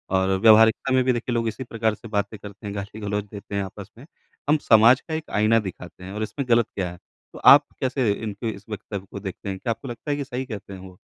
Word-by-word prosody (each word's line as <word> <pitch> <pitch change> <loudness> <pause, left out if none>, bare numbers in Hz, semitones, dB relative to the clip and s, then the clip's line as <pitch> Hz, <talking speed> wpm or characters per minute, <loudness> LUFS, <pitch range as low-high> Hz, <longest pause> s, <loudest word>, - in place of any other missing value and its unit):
और 95 0 +2
व्यावहारिकता 110 +4 +5
में 130 0 +4
भी 130 0 +2
देखिए 120 +1 -3
लोग 115 -1 0
इसी 110 +4 -4
प्रकार 115 -2 -1
से 115 - -12
बातें 105 0 -2
करते 105 0 -10
हैं, 100 - -5
गाली-गलौच 105 0 -4
देते 100 -1 -8
हैं 100 - 0
आपस 95 0 -9
में। 125 - -13 0.4
हम 150 - +5
समाज 115 +4 +6
का 160 - -8
एक 160 0 -4
आइना 110 +2 +4
दिखाते 90 -3 -8
हैं 95 - -8
और 105 +1 -3
इसमें 135 +6 -4
ग़लत 115 -1 +5
क्या 90 -3 -2
है। 90 - -11 0.4
तो - - -10
आप 145 +1 +5
कैसे 130 -4 +1
इनके 105 +2 -4
इस 100 -2 -8
वक्तव्य 100 -2 -6
को 100 - -6
देखते 95 0 -6
हैं? 95 - -3
क्या 120 - -2
आपको 125 +4 -6
लगता 120 +4 -5
है 145 - 0
कि 145 - -2
सही 130 -1 -5
कहते 105 -5 -8
हैं 95 - -9
वो? 95 -1 -12
110 Hz, 255 wpm, -24 LUFS, 100-120 Hz, 0.4 s, समाज